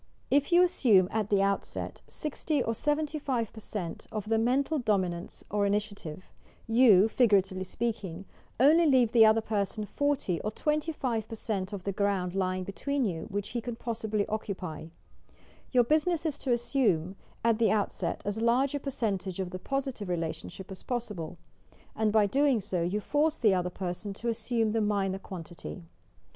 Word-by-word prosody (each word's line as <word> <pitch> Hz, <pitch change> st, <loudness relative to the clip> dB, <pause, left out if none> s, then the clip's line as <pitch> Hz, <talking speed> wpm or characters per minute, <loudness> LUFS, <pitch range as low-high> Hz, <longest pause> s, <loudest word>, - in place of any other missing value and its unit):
If 285 Hz, +4 st, +3 dB
you 350 Hz, +1 st, +7 dB
assume 225 Hz, -, +4 dB
at 215 Hz, -1 st, -1 dB
the 200 Hz, -1 st, +3 dB
outset 200 Hz, 0 st, -2 dB
60 300 Hz, -2 st, -2 dB
or 230 Hz, -, -1 dB
75% 255 Hz, -, -2 dB
of 215 Hz, -1 st, -4 dB
the 225 Hz, 0 st, +3 dB
mental 270 Hz, +6 st, +1 dB
dominance 185 Hz, -7 st, -1 dB
or 205 Hz, 0 st, +2 dB
initiative, 200 Hz, -5 st, -3 dB, 0.4 s
you 225 Hz, -4 st, +6 dB
(figuratively 195 Hz, -5 st, +2 dB
speaking) 195 Hz, -4 st, -3 dB, 0.3 s
only 315 Hz, +6 st, +6 dB
leave 255 Hz, -5 st, +4 dB
the 225 Hz, -2 st, +7 dB
other 220 Hz, +1 st, +4 dB
person 210 Hz, 0 st, -2 dB
40 275 Hz, -, -1 dB
or 215 Hz, -, -2 dB
25% 225 Hz, -, -2 dB
of 200 Hz, -3 st, -6 dB
the 200 Hz, -, -1 dB
ground 195 Hz, -2 st, 0 dB
lying 185 Hz, -1 st, -1 dB
between 270 Hz, +8 st, -2 dB
you, 165 Hz, -6 st, -3 dB
which 205 Hz, 0 st, -3 dB
he 240 Hz, -, -3 dB
ean 240 Hz, -, -2 dB
possibly 220 Hz, -3 st, -2 dB
occupy! 185 Hz, -7 st, -4 dB, 0.8 s
Your 250 Hz, -2 st, +5 dB
business 315 Hz, +5 st, +1 dB
is 305 Hz, -4 st, -1 dB
to 260 Hz, -, -2 dB
assume 235 Hz, -, +1 dB, 0.3 s
at 230 Hz, -1 st, +3 dB
the 230 Hz, -, +4 dB
outset 210 Hz, -2 st, -1 dB
as 205 Hz, +2 st, -2 dB
large 250 Hz, +4 st, +3 dB
a 285 Hz, -, -1 dB
percentage 200 Hz, -9 st, -2 dB
of 185 Hz, -2 st, -3 dB
the 185 Hz, -, -5 dB
positive 265 Hz, -5 st, -3 dB
relation 165 Hz, -2 st, -3 dB
ship 190 Hz, +2 st, -10 dB
as 190 Hz, -, -3 dB
possible, 210 Hz, -10 st, -4 dB, 0.6 s
and 220 Hz, -1 st, +1 dB
by 215 Hz, -1 st, +4 dB
doing 270 Hz, +3 st, +3 dB
so, 190 Hz, -3 st, -2 dB
you 180 Hz, +5 st, 0 dB
force 295 Hz, +8 st, +1 dB
the 215 Hz, -5 st, +4 dB
other 180 Hz, -1 st, 0 dB
person 185 Hz, +2 st, -5 dB
to 235 Hz, +3 st, -3 dB
assume 225 Hz, -1 st, 0 dB
the 225 Hz, 0 st, +1 dB
minor 200 Hz, -2 st, 0 dB
quantity. 165 Hz, -, -8 dB
215 Hz, 160 wpm, -29 LUFS, 190-250 Hz, 0.8 s, you